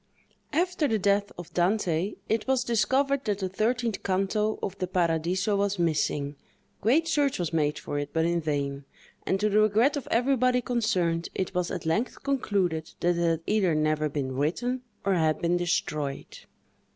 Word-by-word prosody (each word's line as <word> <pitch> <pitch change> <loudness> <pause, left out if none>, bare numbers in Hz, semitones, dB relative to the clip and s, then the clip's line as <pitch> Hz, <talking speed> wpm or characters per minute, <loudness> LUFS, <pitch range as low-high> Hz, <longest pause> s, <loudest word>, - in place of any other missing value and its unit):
After 335 0 +1
the 225 - +1
death 200 0 +1
of 175 -1 -9
Dante, 180 0 +1
it 220 +2 0
was 265 -1 +2
discovered 265 +5 +1
that 205 -3 0
the 190 -2 -2
thirteenth 230 +2 -1
canto 200 +3 0
of 195 - -3
the 185 - -1
"Paradiso" 180 +3 +1
was 200 0 0
missing; 150 -4 0 0.4
great 290 +10 +3
search 290 -4 +1
was 170 -2 -3
made 150 -2 +1
for 145 - -4
it, 145 0 -4
but 160 0 +1
in 170 0 +1
vain; 140 -2 -2 0.4
and 190 - +1
to 210 - +2
the 210 0 +3
regret 215 +7 +3
of 285 - -4
everybody 250 +1 +2
concerned, 185 -9 0
it 190 0 -2
was 180 -1 0
at - - -5
length 210 +10 -1
concluded 195 - -1
that 175 0 +2
it 170 - -1
had 165 -1 +1
either 195 -6 +2
never 155 0 +1
been 140 -2 -3
written, 240 - -1 0.2
or 200 - +3
had 160 -3 +2
been 170 +1 +1
destroyed. 150 -5 -2
190 Hz, 175 wpm, -27 LUFS, 165-225 Hz, 0.4 s, great